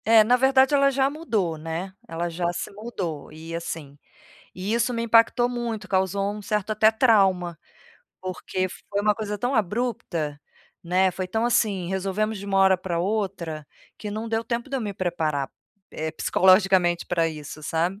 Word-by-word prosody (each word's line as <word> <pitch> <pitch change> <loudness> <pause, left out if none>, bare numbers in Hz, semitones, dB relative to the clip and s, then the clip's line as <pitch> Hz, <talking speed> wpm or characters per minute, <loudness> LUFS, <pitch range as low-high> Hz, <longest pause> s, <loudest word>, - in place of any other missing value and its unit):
É 225 -1 +7
na 245 +4 +4
verdade 265 +2 +4
ela 275 -1 +5
já 270 0 +2
mudou, 215 - -1
né, 165 +4 -5
ela 170 -1 -3
já 170 +1 -1
se 175 - -5
mudou 200 -9 -5
e 160 +2 -9
assim, 150 -4 -6 0.5
e 185 +3 -4
isso 235 +2 +1
me 230 - -1
impactou 230 +1 +4
muito 240 -3 -4
causou 195 +1 0
um - - -7
certo 210 +1 -2
até 215 +1 +5
trauma, 195 -7 +3 0.6
porque 185 0 -3
foi 200 +2 -4
uma 210 0 +2
coisa 210 -2 -3
tão 245 +6 -1
abrupta, 200 - -1 0.4
né, 185 +2 +2
foi 185 +1 -4
tão 220 +5 -1
assim 210 -7 +1
resolvemos 195 +3 -1
de 200 - -8
uma 195 -1 +1
hora 190 -1 +5
pra 175 -2 -2
outra, 185 -6 -2 0.3
que 210 -1 -5
não 220 +2 -4
deu 225 0 -1
tempo 235 +3 -3
de 275 - -1
eu - - -2
me 205 -3 -4
preparar, 160 -7 -1 0.4
eh, 160 0 -4
psicologicamente 185 0 +3
pra 170 -2 +1
isso 155 -1 -7
sabe? 165 +5 -1
195 Hz, 175 wpm, -25 LUFS, 175-225 Hz, 0.6 s, É